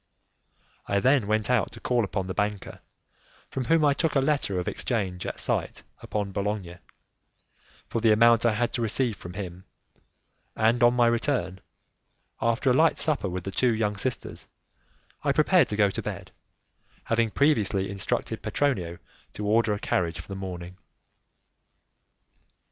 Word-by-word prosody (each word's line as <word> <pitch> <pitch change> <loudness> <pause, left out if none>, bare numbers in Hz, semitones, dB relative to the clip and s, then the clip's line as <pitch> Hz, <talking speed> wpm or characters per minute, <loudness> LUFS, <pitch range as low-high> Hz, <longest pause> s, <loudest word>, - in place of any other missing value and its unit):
I 100 - +1
then 130 -1 +3
went 110 0 0
out 125 -4 +1
to - - -11
call 120 -2 +1
upon 95 -1 -2
the 95 - -4
banker, 105 -1 -3 0.7
from 130 - -3
whom 160 +4 +3
I 145 - +4
took 155 +3 -1
a - - +5
letter 135 -9 0
of 90 - -4
exchange 95 -7 -2
at - - -5
sight - - -1 0.2
upon 105 -2 -3
Bologna, 100 -3 -3 1.1
for 115 - -2
the 110 -1 +4
amount 115 +1 +5
I 115 -3 +2
had 120 +2 -1
to 120 - -2
receive 115 +1 +1
from 90 -2 -10
him, 90 -2 -7 0.9
and 115 +2 +2
on 120 +1 +5
my 120 -1 +4
return, 115 -5 0 0.8
after 115 +3 +2
a - - +4
light 160 +5 +4
supper 145 -11 +1
with 90 0 -4
the 95 - -5
two 120 +3 +2
young 105 -2 0
sisters, 120 +5 -4 0.8
I 140 -2 +2
prepared 155 +1 +4
to 105 - -2
go 100 -1 +3
to - - -4
bed, - - -6 0.7
having 115 0 +1
previously 105 -8 +2
instructed 100 0 -3
Petronio 95 -13 -1 0.4
to 105 - -5
order 110 +1 +2
a 105 - 0
carriage 85 -4 -1
for 85 - -10
the 100 - -6
morning. 90 -2 -7
110 Hz, 160 wpm, -26 LUFS, 95-125 Hz, 1.1 s, a